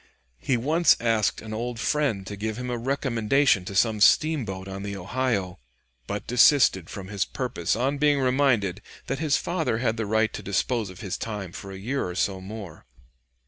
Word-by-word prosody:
He 130 - 0
once 155 +7 +3
asked 115 -3 +1
an 110 -1 -7
old 120 +1 -4
friend 135 -8 0
to 100 - -6
give 110 +2 -4
him 125 0 -4
a 120 - -1
recommendation 125 -4 +1
to 100 - -6
some 110 0 +2
steamboat 105 -8 +3
on 95 0 -6
the 100 0 -5
Ohio, 100 - -2 0.5
but 100 0 -4
desisted 125 - +4
from 95 -2 -8
his 100 -2 0
purpose 120 -10 -2
on 135 +4 -1
being 145 -1 +3
reminded 125 -8 +1 0.2
that 135 +1 -3
his 155 -2 +2
father 165 -10 -1
had 115 -1 0
the 110 -2 -2
right 110 +1 +1
to - - -5
dispose 105 +2 -1
of 95 - -11
his 95 -5 -4
time 105 -5 -5
for 95 +2 -8
a 95 - -7
year 125 +8 -2
or 90 - -6
so 95 0 -1
more. 100 -4 -9
110 Hz, 185 wpm, -25 LUFS, 100-130 Hz, 0.5 s, desisted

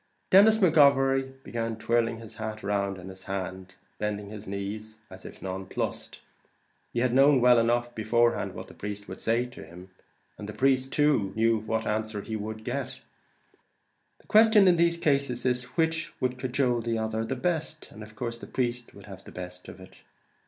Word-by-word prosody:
Denis 215 +3 +7
McGovery 135 -6 +3
began 115 -1 -3
twirling 115 0 +1
his 115 -1 -10
hat 110 -1 -5
round 100 -1 -1
in 90 0 -10
his 95 0 -11
hand, 95 -1 -3
and 95 -1 -15 0.2
bending 105 -1 -3
his 105 -1 -9
knees, 105 +3 -5
as 95 0 -11
if - - -12
nonplussed. 95 0 -4 0.7
He 120 - -1
had 125 -1 +1
known 135 +1 +6
well 125 -1 +6
enough, 120 +1 +1
beforehand, 115 +2 +1
what - - -8
the - - -13
priest 105 0 -6
would - - -8
say 115 +2 +1
to 125 - -11
him, 90 +3 -13 0.5
and 105 - -7
the - - -6
priest 135 +1 +1
too, 140 -10 +2 0.3
what 110 0 -1
answer 110 -1 -2
he 110 - -5
would 110 +1 -5
get. 130 +2 -4 1.2
The - - -24
question 215 -2 +6
in 175 -2 +5
these 170 0 +3
cases 140 -6 0
is, 125 0 +1
which 160 0 0
would 125 0 -1
cajole 125 -2 0
the 115 0 -1
other 110 0 -2
the 115 +4 -3
best, 160 +2 -3
and 110 - -12
of 110 0 -11
course 115 0 -4
the - - -9
priest 120 -1 -3
would 100 - -13
have 95 -1 -11
the - - -12
best 90 0 -8
of 95 - -10
it. 95 - -14
115 Hz, 185 wpm, -27 LUFS, 105-135 Hz, 1.2 s, Denis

